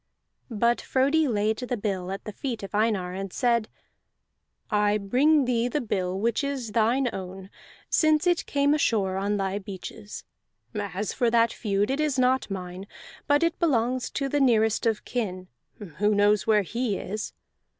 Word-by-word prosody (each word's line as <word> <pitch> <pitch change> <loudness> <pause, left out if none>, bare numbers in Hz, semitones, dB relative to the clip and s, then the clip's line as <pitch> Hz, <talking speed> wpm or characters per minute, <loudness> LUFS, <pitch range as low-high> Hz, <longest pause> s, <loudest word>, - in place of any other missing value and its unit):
But 235 +1 +1
Frodi 280 +4 +2
laid 215 -2 0
the 250 -1 -3
bill 190 -3 -3
at 195 0 -5
the 215 - -5
feet 230 0 -5
of 195 - -8
Einar, 205 -4 0
and 195 0 -5
said: 235 -1 +1 1.0
"I 210 0 +3
bring 265 +9 +3
thee 240 -1 +1
the 275 +5 -1
bill 190 -6 -2
which 230 +5 0
is 270 -5 -3
thine 235 +4 +2
own, 190 0 -7 0.4
since 310 +1 +3
it 350 -1 +1
came 285 0 +2
ashore 205 -10 +1
on 200 +2 0
thy 195 0 -1
beaches. 200 +1 -8 0.5
As 205 -1 -3
for 245 -3 +1
that 230 0 +3
feud, 205 +1 0
it 275 - -1
is 300 -3 0
not 255 -1 +2
mine, 185 0 -6 0.4
but 290 +2 +3
it 335 0 0
belongs 255 -6 +1
to 275 - -2
the 290 +2 0
nearest 225 -3 +3
of 220 -2 -1
kin. 185 -7 -3 0.3
Who 205 +2 -1
knows 205 +1 +3
where 210 -2 +4
he 230 +2 -2
is? 210 +2 -5
220 Hz, 165 wpm, -26 LUFS, 200-255 Hz, 1.0 s, where